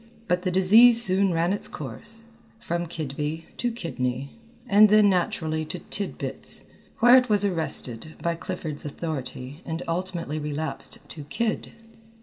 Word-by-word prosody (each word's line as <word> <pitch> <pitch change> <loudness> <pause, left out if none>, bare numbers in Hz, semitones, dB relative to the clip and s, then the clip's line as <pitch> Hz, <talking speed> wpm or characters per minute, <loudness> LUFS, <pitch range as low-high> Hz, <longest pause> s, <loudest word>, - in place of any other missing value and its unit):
But 180 0 +1
the 185 - -1
disease 220 +6 +7
soon 195 -3 +4
ran 170 +2 +1
its 205 - -2
course 155 - -8 0.4
from 170 -4 -3
"Kidby" 155 0 -4
to 245 - -1
"Kidney," 135 - -3 0.4
and 210 0 +6
then 210 -1 +6
naturally 160 -3 -1
to - - -5
"Tidbits," 200 -1 -3 0.3
where 240 +2 +7
it 250 -1 +2
was 205 -1 +3
arrested 160 - -3
by 170 - -1
Clifford's 165 -3 -5
authority 145 -2 -6
and 160 0 -4
ultimately 170 -3 -3
relapsed 150 +1 -4
to 150 -3 -9
"Kid." 225 +8 -2
170 Hz, 135 wpm, -25 LUFS, 150-200 Hz, 0.4 s, disease